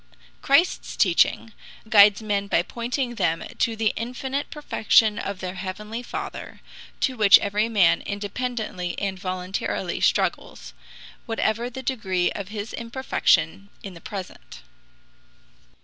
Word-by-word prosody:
Christ's 285 +7 +2
teaching 195 +4 +2 0.3
guides 205 0 +6
men 200 -2 -1
by 175 - +2
pointing 240 +4 -3
them 165 -8 0 0.2
to 230 - +1
the 220 -1 +1
infinite 265 +4 -4
perfection 220 -7 +2
of 200 -4 -5
their 185 0 -4
heavenly 210 +5 -6
Father, 245 - -7 0.4
to 260 - +1
which 210 -4 +8
every 210 +2 -1
man 200 -7 +4
independently 205 -3 -4
and 195 -2 -3
voluntarily 185 +1 -3
struggles, - - -1 0.5
whatever 225 +1 -1
the 260 +2 -8
degree 190 -9 0
of 200 -2 -6
his 210 +1 -6
imperfection 200 -7 0
in 195 - -7
the 170 - -13
present. 190 -1 -9
210 Hz, 120 wpm, -24 LUFS, 190-235 Hz, 0.5 s, which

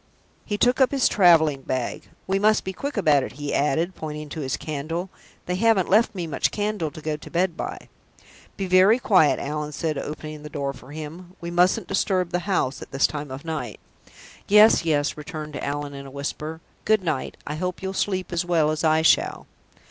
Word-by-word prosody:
He 205 - -2
took 245 +5 +3
up 260 - +6
his 275 -3 +2
traveling 160 -7 +4
bag. 130 -2 -4 0.2
"We 195 +1 0
must 215 +1 +3
be 190 - -4
quick 280 +6 -5
about 150 -8 +4
it," - - -6
he 145 +1 -4
added, 160 +6 +1
pointing 150 -2 -6
to 160 - -6
his 130 -2 -2
candle. 165 +5 -4 0.3
"They 180 - -2
haven't 220 -4 +3
left 220 +1 +4
me 175 -3 -3
much 155 - 0
candle 205 -6 -2
to 155 +1 -11
go 155 0 -2
to - - -12
bed 175 0 0
by." - - -6 0.7
"Be 195 - -2
very 185 +5 +5
quiet, 185 - +4
Allan," 150 +1 -4
said 155 -1 -2
Midwinter, 140 - -4
opening 155 0 -8
the 150 - -8
door 140 -2 -3
for 130 +1 -14
him. 160 +4 -8
"We 170 0 -6
mustn't 180 +4 +3
disturb 185 -2 0
the 180 - 0
house 140 -8 0
at - - -9
this 135 0 +2
time 150 -1 -3
of 130 +4 -8
night." 150 -9 -4 0.7
"Yes, 210 -3 +6
yes," 145 -3 +1
returned 150 -2 -6
Allan, 145 0 -3
in 140 0 -8
a - - -9
whisper. 150 +3 -5 0.2
"Good 215 -2 +2
night; 155 -6 -2
I 145 - -4
hope 180 +4 -4
you'll 190 0 -3
sleep 185 -2 -2
as 170 0 +1
well 165 -3 +2
as 155 - -3
I 160 0 +3
shall." - - +3
160 Hz, 205 wpm, -24 LUFS, 150-185 Hz, 0.7 s, up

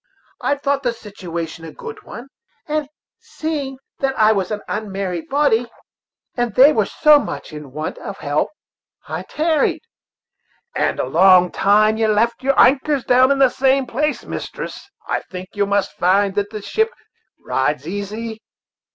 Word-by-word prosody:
I 285 - +1
thought 280 0 -1
the 245 -3 0
situation 170 -7 -7
a 160 - -8
good 455 -1 -9
one, 245 +3 -10 0.9
seeing 290 -4 -4 0.2
that 270 -1 -1
I 215 0 +5
was 195 -4 0
an 210 -1 -3
unmarried 195 -5 -4
body, 265 -5 +2 0.7
and 240 -4 -1
they 280 +4 +7
were 215 -3 +1
so 300 -1 +5
much 185 - -6
in 150 -3 -9
want 155 +3 -5
of 200 - -7
help; 145 +1 -1 0.6
so - - -10
I - - -2
tarried." 315 +3 0 0.9
"And - - 0
a - - 0
long 180 +1 +5
time 215 +2 +3
you've 220 -1 +2
left 235 +2 +1
your 275 +1 +1
anchors 270 +1 +4
down 255 +1 +4
in 280 - +3
the 270 -1 +5
same 270 +1 +2
place, 300 +5 -2
mistress. - - -7 0.2
I - - 0
think 185 0 -7
yo' 205 -1 0
must 200 -1 0
find 195 +2 +2
that 205 0 -1
the 215 -2 -7
ship 440 - +1 0.5
rides 150 +2 -1
easy." 215 +4 -5
220 Hz, 160 wpm, -20 LUFS, 195-270 Hz, 0.9 s, they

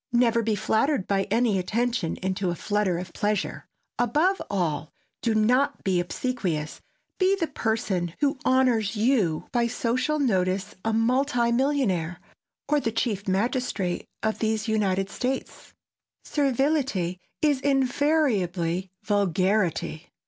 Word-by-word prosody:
Never 235 -1 +3
be 220 -1 0
flattered 220 +3 +1
by 195 -1 +1
any 220 -2 +2
attention 230 -1 -1
into 190 0 -1
a 175 - -1
flutter 205 -1 0
of 175 0 -7
pleasure. 210 -1 -2 0.3
Above 300 - +2
all, 170 -6 -1 0.3
do 230 -2 +1
not 250 +7 +2
be 185 -2 +2
obsequious, 175 -6 -2 0.4
be 380 +1 +4
the 365 -4 -1
person 195 - -2
who 285 -2 +1
honors 245 -5 +2
you 210 - +1
by 240 -1 +2
social 245 +5 0
notice 195 -6 0
a 225 - 0
multi 240 +2 +2
millionaire, 235 - 0 0.5
or 295 - +3
the 230 -5 -1
Chief 210 -3 -2
Magistrate 200 -2 -1 0.2
of 220 0 0
these 220 0 0
United 195 -3 0
States. 260 +5 -4 0.5
Servility 270 - 0 0.2
is 290 -3 +3
invariably 245 - +1
vulgarity. 190 -4 0
220 Hz, 120 wpm, -26 LUFS, 190-255 Hz, 0.5 s, be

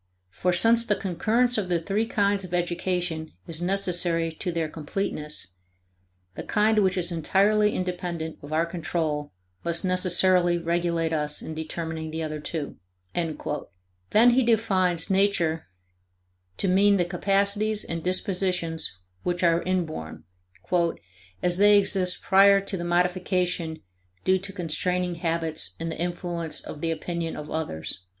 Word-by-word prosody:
For 180 - 0
since 230 +6 +5
the 210 -3 +1
concurrence 220 +7 +1
of 190 -3 -3
the 175 -1 +2
three 200 +6 -1
kinds 200 -2 +1
of 180 -1 -4
education 175 -2 -1
is 165 0 -7
necessary 175 -3 +1
to 180 +3 -4
their 165 -2 -1
completeness, 150 - -4 0.8
the - - -5
kind 215 0 +2
which 190 -2 +2
is 175 -1 -1
entirely 200 +6 +2
independent 175 -3 -4
of 145 - -10
our 160 +2 +2
control 160 -3 -2 0.3
must 170 +1 -1
necessarily 180 -1 +3
regulate 170 -1 0
us 150 -1 -1
in 160 - -6
determining 160 0 -4
the 160 +1 -4
other 155 -1 -4
two." 150 -1 -5 1.3
Then 235 +3 +6
he 255 +2 +4
defines 195 -7 +2
Nature 190 -5 +1 0.9
to - - 0
mean 200 +2 +4
the 175 - +2
capacities 200 +4 +1
and 165 -1 -4
dispositions 180 - 0 0.2
which 175 0 -2
are 170 0 +4
inborn, 160 - -3 1.2
"as 180 +1 +2
they 205 0 +7
exist 190 -2 +1
prior 195 +1 +6
to 195 0 -4
the 170 - -4
modification 180 - 0 0.4
due 185 0 +3
to 195 +1 -6
constraining 180 0 -1
habits 165 -2 0
and 165 0 -3
the - - -7
influence 175 -1 -2
of 150 - -8
the 165 - 0
opinion 165 +1 -3
of 150 0 -7
others." 90 - -4
175 Hz, 140 wpm, -26 LUFS, 165-195 Hz, 1.3 s, they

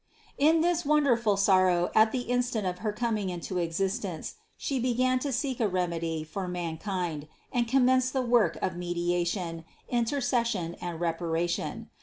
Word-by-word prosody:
233. 290 +2 +6
In 325 - +3
this 350 0 +1
wonderful 245 -8 +3
sorrow 185 -3 +3
at 220 0 +5
the 255 - -1
instant 245 -3 -1
of 180 -1 -2
her 215 +1 -1
coming 215 -3 -1
into 180 +1 -3
existence, 180 0 -2 0.2
She 275 -2 -2
began 255 +1 +2
to 280 +2 -2
seek 265 0 -2
a 225 - +3
remedy 170 -4 -1
for 185 +4 -5
mankind 175 -2 -3 0.3
and 240 -2 +1
commenced 255 0 +3
the 260 -1 0
work 235 -9 +3
of 185 - -1
mediation, 175 -1 -2 0.3
inter 240 +3 +1
cession 235 -9 0
and 175 -2 -4
reparation. 170 0 -2
195 Hz, 155 wpm, -28 LUFS, 175-245 Hz, 0.3 s, 233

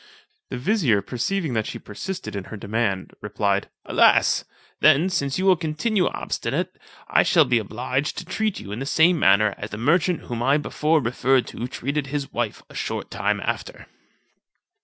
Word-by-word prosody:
The - - -4
vizier, 130 - +2
perceiving 140 - -2
that 110 -2 -1
she - - -5
persisted 180 - -6
in 100 -2 -4
her 110 - -8
demand, 100 -2 -2
replied, 100 -1 -1 0.2
"Alas! - - +4 0.3
then, 165 +7 +5
since 140 -6 -1
you 190 - -1
will 190 -1 +6
continue 175 +5 0
obstinate, - - -3 0.3
I - - +4
shall 160 -4 +4
be 125 -2 +2
obliged 130 +6 -2
to 180 - -5
treat 215 +4 -1
you 100 - -9
in 105 - -4
the 135 - -4
same 160 +3 +4
manner 100 -1 +4
as 105 - -5
the 105 - -6
merchant 165 +8 +2
whom 120 -1 -5
I 135 +4 +3
before 155 +1 +1
referred 125 +2 +2
to 120 - -5
treated 140 +3 -3
his 140 0 -4
wife 115 -3 -3
a - - -16
short - - -4
time - - -1
after." - - -4
135 Hz, 175 wpm, -23 LUFS, 110-165 Hz, 0.3 s, will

